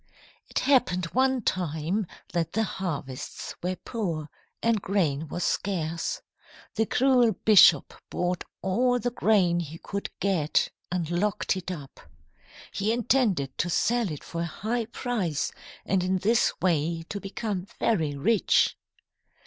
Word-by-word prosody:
It - - -4
happened 185 -10 +3
one 260 -1 +2
time 175 +3 -1 0.3
that 165 -2 -1
the 225 - +2
harvests 145 -10 -5
were 180 +1 -1
poor 170 -10 -4 0.3
and 230 -3 +2
grain 160 -7 0
was 175 +4 -3
scarce. 170 -4 -1 0.5
The 220 0 0
cruel 250 -3 +4
bishop 190 -8 +7 0.2
bought 180 0 -1 0.2
all 245 +7 +2
the 245 +1 -1
grain 195 -7 +3
he 165 -1 -5
could 200 +3 -5
get 180 -7 +1 0.2
and 175 -3 -1
locked 190 +2 0
it 185 -1 -5
up. 145 -7 -7 0.7
He 205 +2 0
intended 225 - +1
to 175 - +1
sell 235 +4 +1
it 150 - -7
for 170 - -5
a - - 0
high 225 +7 -2
price, 215 - -2 0.3
and 190 -2 +1
in 185 +1 +1
this 220 +6 +3
way 165 -2 +1
to 200 - -4
become 195 -1 -4
very 160 -10 +1
rich. 205 +9 +3
185 Hz, 135 wpm, -27 LUFS, 165-220 Hz, 0.7 s, bishop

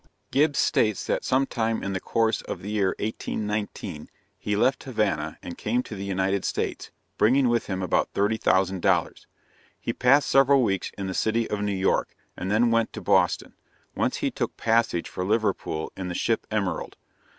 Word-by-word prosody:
Gibbs 145 +1 +3
states 105 -3 +2
that - - -1
sometime 120 -4 0
in 100 - -2
the 95 - -1
course 115 +2 0
of - - -7
the 100 - -5
year 100 -3 +1
1819, 105 -6 -4 0.3
he 105 - -1
left 125 +6 +2
Havana 110 -6 -1
and 85 - -8
came 120 +4 0
to - - -9
the 100 -2 -5
United 95 0 0
States, - - -3 0.3
bringing 130 +3 +4
with 120 -1 +1
him 95 -1 -2
about 90 - +1
$30,000. 95 -3 +1 0.5
He - - -3
passed 135 +4 +4
several 135 0 +5
weeks 95 -4 -1
in 100 - -3
the 95 - -3
city 115 +4 +1
of 105 -1 -1
New 105 0 0
York, 95 +1 0 0.2
and 95 - -4
then 115 +3 +3
went 115 -1 +2
to - - -6
Boston, - - +2 0.4
whence - - 0
he - - +1
took - - -3
passage 115 -6 +1
for 90 - -4
Liverpool 100 -6 -1
in 95 -1 -5
the 90 - -4
ship 115 +4 0
Emerald. 105 -4 -2
105 Hz, 175 wpm, -25 LUFS, 95-115 Hz, 0.5 s, several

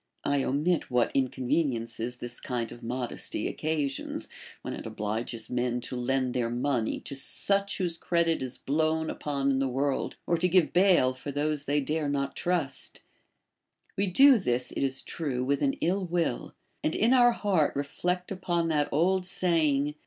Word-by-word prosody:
I 140 -1 +1
omit 155 +6 0
what 125 -1 +2
inconveniences 125 -3 -1
this 120 0 -7
kind 120 -3 -3
of 120 - -10
modesty 120 +1 -3
occasions, 150 -4 -3 0.4
Λvhen - - -4
it - - -9
obhges 110 +1 -3
men 125 0 -1
to 125 - -5
lend 130 0 0
their 120 -2 0
money 120 -1 -1
to - - -6
such 200 +8 +2
Avhose 175 -3 -1
credit 170 -1 +1
is 130 -1 -4
blown 160 +2 0
upon 140 -2 -1
in 135 - +1
the 135 -1 +1
workl, 135 +2 -1
or 170 - +1
to 180 - +3
give 180 -2 +3
bail 175 -8 +4
for 130 +2 -7
those 145 0 -1
they 145 +1 +1
dare 150 +1 -1
not 140 -1 -1
trust; 175 -6 -2 0.9
we 200 +1 0
do 265 +7 +7
this, 125 -7 -1
it - - -4
is 135 -1 -1
true, 135 -6 -3
with 140 +2 0
an 275 - +2
ill 185 +4 +1
will, 170 -7 -2 0.3
and 155 - 0
in 230 +4 +3
our 240 -2 +6
heart 190 -10 +1
reflect 180 +6 -2
upon 175 -3 -1
that 150 -2 +1
old 185 +5 +2
saying. 155 -6 +1
145 Hz, 165 wpm, -28 LUFS, 130-170 Hz, 0.9 s, do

